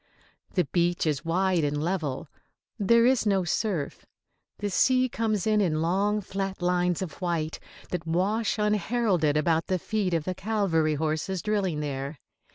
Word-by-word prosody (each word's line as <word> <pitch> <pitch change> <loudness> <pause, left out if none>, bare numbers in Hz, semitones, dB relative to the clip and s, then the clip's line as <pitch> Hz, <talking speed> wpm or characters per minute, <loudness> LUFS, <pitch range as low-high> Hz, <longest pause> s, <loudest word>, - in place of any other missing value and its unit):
The 180 -3 +3
beach 175 +3 +1
is 150 -2 0
wide 180 0 +1
and 145 0 0
level. 155 -5 -2 0.5
There 230 +3 +4
is 255 -3 +3
no 195 -2 +2
surf. 175 -4 -2 0.5
The 205 -1 -3
sea 255 +6 +3
comes 220 -5 -1
in 215 -1 +3
in 160 -5 +1
long, 200 +5 +1
flat 195 0 -4
lines 180 0 +1
of 175 -1 -8
white 165 -3 -2 0.3
that 170 -2 -3
wash 200 +7 0
unheralded 210 -6 +1
about 160 +1 +1
the 185 - +1
feet 195 -1 -1
of 165 - 0
the 185 - -2
cavalry 180 -7 +1
horses 160 +4 -2
drilling 195 -7 0
there. 140 0 -4
180 Hz, 155 wpm, -27 LUFS, 160-205 Hz, 0.5 s, There